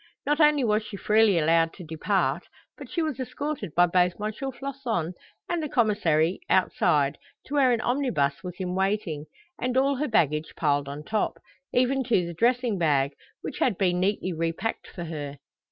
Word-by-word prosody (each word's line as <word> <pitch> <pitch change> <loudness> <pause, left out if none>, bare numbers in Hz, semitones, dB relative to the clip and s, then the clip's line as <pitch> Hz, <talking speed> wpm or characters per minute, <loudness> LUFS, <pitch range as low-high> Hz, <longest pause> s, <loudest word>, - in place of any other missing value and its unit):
Not 295 +2 +1
only 300 -3 +5
was 215 -2 +2
she 210 -1 -8
freely 215 -2 +4
allowed 165 +1 +3
to 185 - -10
depart, 165 +5 -1 0.3
but - - -10
she 340 -2 -1
was 305 -5 -3
escorted 280 - -4
by 175 +1 +6
both 180 0 +2
M. 210 +1 -2
Floçon 255 - -3 0.3
and 345 -1 -1
the 305 - -3
Commissary 190 -9 +2
outside, 150 -6 +2 0.3
to 280 - -8
where 270 -3 +4
an 235 -2 +1
omnibus 240 - 0
was 180 -1 -6
in 180 -1 -3
waiting, 190 -6 -1 0.4
and 255 0 0
all 275 +1 +3
her 300 +3 -1
baggage 155 - +1
piled 145 -2 +1
on 145 +2 -6
top, 215 +6 -1 0.3
even 260 +2 +2
to 220 -7 +2
the 170 - -5
dressing 235 +1 +1
bag, 140 -4 +2 0.3
which - - -5
had 225 -8 +2
been 180 -2 +1
neatly 185 -1 0
repacked 165 +7 -2
for 175 - -7
her. 145 -4 -6
195 Hz, 175 wpm, -26 LUFS, 165-250 Hz, 0.4 s, by